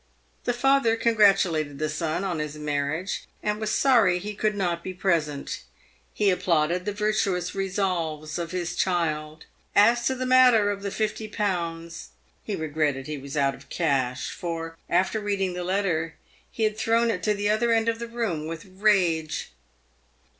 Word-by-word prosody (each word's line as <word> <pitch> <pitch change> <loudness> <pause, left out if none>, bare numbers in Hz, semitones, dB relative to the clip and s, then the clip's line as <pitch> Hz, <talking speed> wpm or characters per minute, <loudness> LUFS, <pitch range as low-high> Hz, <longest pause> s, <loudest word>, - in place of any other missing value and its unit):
The 245 - +1
father 270 -2 +3
congratulated 195 -10 +3
the 155 - -1
son 155 +3 -2
on 180 -5 -2
his 150 -1 -4
marriage, 150 +5 -2 0.2
and 210 0 -1
was 215 -1 -2
sorry 230 -11 +4
he 205 +4 -5
could 210 +1 0
not 175 -4 -1
be 185 - -6
present. 160 -6 -1 0.5
He 205 -2 +2
applauded 175 0 +1
the 205 - -1
virtuous 205 -4 0
resolves 175 -5 -2
of 170 -1 -3
his 175 -1 -3
child. 155 -4 -1 0.3
As 235 +3 +5
to 260 - +1
the 255 0 -3
matter 250 -5 +5
of 200 -1 -5
the 200 - -3
50Z., 185 -6 -3 0.4
he 210 - -3
regretted 150 -4 -1
he 150 -1 -5
was 140 +2 -7
out 140 -1 +2
of - - -15
cash, 135 -6 0
for, 165 -3 -5
after 185 +5 +2
reading 200 -3 -1
the 180 0 -4
letter, 175 -4 -1 0.3
he 225 - -3
had 215 0 0
thrown 230 +1 +2
it 180 - -3
to 210 +1 +1
the 205 +1 +1
other 230 +2 +2
end 225 0 +2
of 230 0 0
the 235 - -4
room 220 -10 -2
with 165 +3 -6
rage. 185 -5 +1
185 Hz, 165 wpm, -26 LUFS, 160-210 Hz, 0.5 s, As